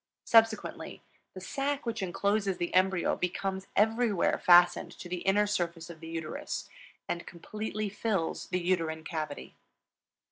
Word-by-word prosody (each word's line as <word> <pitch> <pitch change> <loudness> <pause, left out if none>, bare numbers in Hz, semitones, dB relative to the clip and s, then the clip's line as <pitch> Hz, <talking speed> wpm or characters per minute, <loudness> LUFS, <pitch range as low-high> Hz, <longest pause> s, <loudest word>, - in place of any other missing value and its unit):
Subsequently, 225 -1 +2 0.3
the - - -6
sac 275 +8 -2
which 230 -2 -2
incloses 195 +1 0
the 175 - -3
embryo 185 -1 +3
becomes 190 +2 -3
everywhere 220 -2 +2
fastened 175 -1 +6
to - - -9
the 180 +1 -3
inner 205 +2 +4
surface 170 -4 -2
of 160 - -12
the 165 - -9
uterus 165 -1 -5 0.4
and 170 - -4
completely 215 +4 -4
fills 200 -4 -2
the 180 - -1
uterine 165 -3 -1
cavity. 155 -3 -5
185 Hz, 135 wpm, -30 LUFS, 170-210 Hz, 0.4 s, fastened